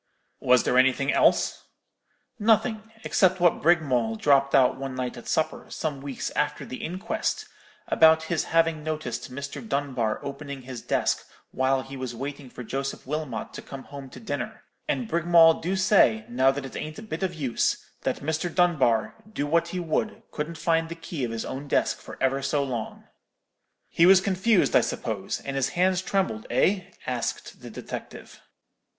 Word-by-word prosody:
"'Was 125 0 +4
there 125 - +3
anything 130 +2 +3
else?' - - +2 0.7
"'Nothing; 220 0 +2
except 185 -1 +3
what 175 -1 +3
Brigmawl 135 -9 +2
dropped 140 +3 +3
out 130 -2 +5
one 135 -1 -5
night 125 -1 -3
at 120 - -11
supper, 160 - -1
some 145 -4 -4
weeks 140 -2 -4
after - - -1
the 130 - -7
inquest, 185 +5 -2 0.4
about 160 0 +5
his 160 +1 -1
having 165 -2 +2
noticed 155 -8 -4
Mr. 140 +2 -6
Dunbar 135 - -1
opening 140 -1 -6
his 125 -2 -7
desk - - 0 0.3
while 130 0 +1
he 135 +1 -9
was 130 -2 -5
waiting 140 +2 -6
for 125 - -9
Joseph 135 +4 -4
Wilmot 145 -5 -4
to - - -7
come 135 -1 -9
home 140 -2 -9
to - - -11
dinner; 225 - -5 0.2
and 245 - -1
Brigmawl 170 -3 +5
do 180 +4 -1
say, 185 - +4
now 130 +2 +3
that 135 0 -2
it 135 - -9
ain't 155 0 -5
a - - -8
bit 180 -6 -5
of 185 -2 -1
use, 135 -7 0 0.2
that - - -2
Mr. 160 +4 -2
Dunbar, 155 -11 +2 0.2
do 145 - -2
what 170 +3 +2
he 180 +2 -4
would, 195 +7 -2
couldn't 160 +2 -4
find 165 0 +1
the 170 - -5
key 165 -4 -6
of 120 - -1
his 115 0 -4
own 140 +2 -6
desk - - +1
for - - -10
ever 135 +1 +1
so 140 +1 0
long.' 120 -5 -5 0.8
"'He 170 - +4
was 190 0 +8
confused, 190 +2 +2
I - - +7
suppose; - - -3
and 135 - -5
his 135 -1 +1
hands 185 0 +3
trembled, 185 - -1
eh?' 185 +10 +2 0.2
asked 125 -2 -4
the - - -9
detective. - - -8
145 Hz, 175 wpm, -26 LUFS, 130-170 Hz, 0.8 s, was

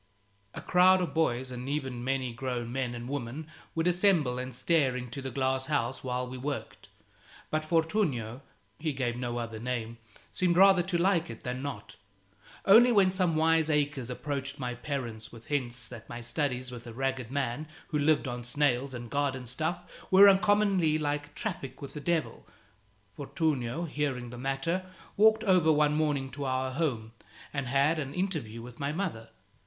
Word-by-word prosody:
A - - -5
crowd 185 +1 +5
of 180 - -2
boys 130 -5 0
and 125 +1 -5
even 135 -4 -3
many 130 -2 -1
grown 120 -1 -3
men 125 -2 -2
and 120 0 -6
women 140 +2 -4 0.3
would 165 0 0
assemble 175 -8 +3
and 130 -1 -5
stare 140 -3 +2
into 125 +1 -5
the 135 - -4
glass 130 +1 0
house 130 -4 -1
while 125 0 -2
we 130 0 -7
worked; 140 +2 -5 0.6
but 155 0 0
Fortunio 155 - 0 0.4
(he 155 -1 -1
gave 125 -3 -1
no 120 -1 -3
other 115 -2 -4
name) 115 -1 -4 0.3
seemed 175 -2 +2
rather 190 -1 +7
to 175 0 -1
like 175 -3 +2
it 115 - -9
than 125 +1 -3
not. 140 -1 -6 0.7
Only 235 +5 +8
when 195 -4 +5
some 185 -3 +1
wiseacres 155 -5 +2
approached 140 +1 -4
my 125 -2 -3
parents 120 -4 -5
with 115 -1 -13
hints 125 -4 -2
that 115 - -11
my 120 - -6
studies 125 +1 -2
with 120 -1 -9
a 115 - -8
ragged 130 -1 -2
man 140 +2 -2 0.2
who 150 - 0
lived 150 -1 +3
on 120 -1 -4
snails 130 0 0
and 120 -1 -6
garden 135 -1 -1
stuff 155 +8 -2 0.3
were 195 +2 +9
uncommonly 195 -5 +4
like 145 -1 -3
traffic 140 - -5
with 140 - -8
the 150 - -6
devil, 165 +2 -1 0.7
Fortunio, 145 0 -1
hearing 140 -6 -2
the 120 - -8
matter, 135 +8 -1 0.3
walked 220 +1 +5
over 180 -5 +4
one 150 -1 +3
morning 145 -3 0
to 140 +2 -5
our 130 0 -1
home 130 -7 -2 0.4
and 140 -3 -2
had 140 +5 +2
an 140 -2 -4
interview 155 - -3
with 120 0 -11
my 140 0 -1
mother. 155 - -3
140 Hz, 170 wpm, -29 LUFS, 125-160 Hz, 0.7 s, were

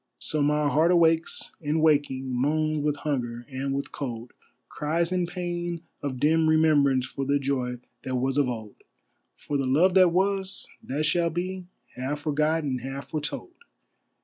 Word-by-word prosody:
So 155 - -1
my 150 +1 +2
heart 155 +5 +3
awakes, 165 -2 +3
and 150 +1 0
waking, 140 -4 +2
moans 155 +4 +1
with 150 -1 +1
hunger 120 -5 -3
and 135 +1 -3
with 140 - -4
cold, 120 -4 -6 0.3
Cries 165 +3 -1
in 180 -1 0
pain 175 -1 -4 0.2
of 130 -3 -3
dim 160 +3 +3
remembrance 145 -5 +4
for 135 +1 -5
the 140 +1 +2
joy 130 -3 -1 0.3
that 130 - -2
was 130 +1 0
of 140 -3 +2
old; 110 -4 -6 0.6
For 145 - -3
the 135 -1 -1
love 165 +8 +4
that 185 -2 +6
was, 190 +1 0
that 145 +4 -2
shall 170 +2 +2
be, 180 +2 -4 0.3
half 140 +4 -3
forgot 155 +2 +1
and 130 -4 -2
half 135 +2 -6
foretold. 155 - -4
150 Hz, 160 wpm, -26 LUFS, 135-165 Hz, 0.6 s, that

